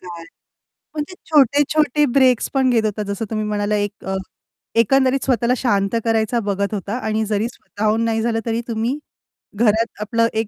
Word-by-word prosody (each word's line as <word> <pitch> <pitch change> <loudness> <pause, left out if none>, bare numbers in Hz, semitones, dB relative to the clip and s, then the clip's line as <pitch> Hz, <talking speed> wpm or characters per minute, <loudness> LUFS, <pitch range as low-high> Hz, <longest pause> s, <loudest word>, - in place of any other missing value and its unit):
काय? 170 -2 -9 0.7
म्हणजे 305 +4 -4 0.2
छोटे-छोटे 295 +1 +3
ब्रेक्स 255 -3 +3
पण 265 -1 +3
घेत 225 -2 +2
होता, 210 0 -1
जसं 200 +2 -3
तुम्ही 215 -1 -1
म्हणाला 210 0 -1
एक 205 0 -3
अ, 190 - -2 0.7
एकंदरीत 265 +3 +3
स्वतःला 250 -1 +2
शांत 200 -4 +1
करायचा 225 +1 +1
बघत 200 +1 -1
होता 205 +3 -3
आणि 220 0 0
जरी 215 +1 0
स्वतःहून 215 -1 -2
नाही 225 -1 0
झालं, 225 0 0
तरी 230 0 -1
तुम्ही 230 +4 -1 0.6
घरात 225 +1 +3 0.2
आपलं 230 +2 +1
एक 220 0 -1
225 Hz, 160 wpm, -20 LUFS, 210-250 Hz, 0.7 s, छोटे-छोटे